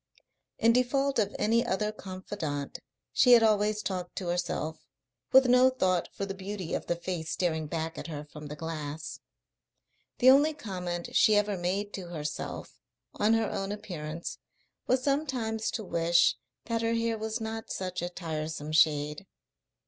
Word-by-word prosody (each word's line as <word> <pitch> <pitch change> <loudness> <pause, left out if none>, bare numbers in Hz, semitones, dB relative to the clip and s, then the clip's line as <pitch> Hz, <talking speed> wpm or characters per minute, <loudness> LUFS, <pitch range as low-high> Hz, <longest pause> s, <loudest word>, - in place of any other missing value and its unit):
In 230 +1 +4
default 270 +2 +2
of 205 -2 0
any 230 +3 +3
other 210 -2 0
confidant 185 -8 -5 0.3
she 250 - +6
had 235 -1 +8
always 210 -1 +2
talked 180 -2 -4
to 180 -3 -3
herself, 175 -3 -2 0.5
with 265 0 +8
no 250 +1 +6
thought 185 -9 +1
for 200 - -4
the 195 - -4
beauty 195 -2 -5
of - - -2
the 175 - +1
face 170 -2 -4
staring 160 -4 0
back 165 +1 -3
at - - -6
her 150 -2 -6
from 150 -1 -8
the 150 - -6
glass. 155 -1 -5 1.0
The 255 +1 +7
only 295 +3 +5
comment 180 - -5
she 215 - +6
ever 205 0 +2
made 190 +3 -2
to 185 -3 -6
herself 150 -3 -5 0.3
on 215 +2 +3
her 225 -2 0
own 195 +1 -3
appearance 170 -6 -5 0.5
was 255 0 +2
sometimes 255 -6 0
to 220 - -3
wish 170 -4 +3 0.3
that 230 -1 -1
her 230 0 +1
hair 230 0 0
was 220 +1 -2
not 225 0 -5
such 185 -1 -3
a 175 - -2
tiresome 155 -3 -4
shade. 150 +3 +2
190 Hz, 160 wpm, -29 LUFS, 165-225 Hz, 1.0 s, had